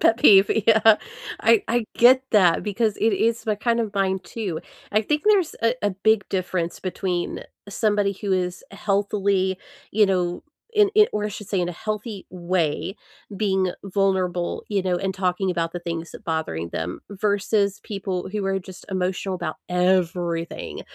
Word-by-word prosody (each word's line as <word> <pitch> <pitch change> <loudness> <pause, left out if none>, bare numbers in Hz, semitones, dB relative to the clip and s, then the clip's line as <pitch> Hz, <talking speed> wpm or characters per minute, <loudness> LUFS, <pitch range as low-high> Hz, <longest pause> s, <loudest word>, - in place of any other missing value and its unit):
Pet 225 - +4
peeve, 200 -4 +7 0.2
yeah. 220 -1 +6 0.4
I 225 -1 +4
I 240 0 +1
get 255 +2 +6
that 190 -7 +4
because 215 +1 0
it 225 - +2
is 230 +3 +1
my 215 - +2
kind 235 +3 0
of 220 -3 -2
mine 190 -1 +1
too. 185 -3 -4 0.3
I 215 +1 +2
think 295 +7 0
there's 405 -6 +3
a 230 +1 +3
a 205 - +2
big 205 +2 +2
difference 180 -2 -2
between 180 -1 -2 0.3
somebody 205 -1 +1
who 200 -2 -1
is 180 -1 -1
healthily, 200 -2 0 0.3
you 210 0 +4
know, 180 -2 0 0.3
in 420 -1 +5
in 425 0 +7
or 210 0 -1
I - - -2
should 210 0 -8
say 195 - 0
in 175 - -1
a - - -3
healthy 215 -1 -4
way 180 +1 -1 0.4
being 190 -3 +1
vulnerable, 185 -3 0
you 200 -2 0
know, 180 -1 0
and 190 +1 -2
talking 185 0 0
about 165 -2 -1
the 175 - -5
thing's 170 -1 -5
that - - -11
bothering 120 - -2
them 90 +3 -4
versus 200 0 0
people 195 -3 -4
who 210 -1 -2
are 195 0 +1
just 190 0 -12
emotional 185 +1 -1
about 155 -3 -4
everything, 180 -2 0
195 Hz, 170 wpm, -23 LUFS, 180-210 Hz, 0.4 s, peeve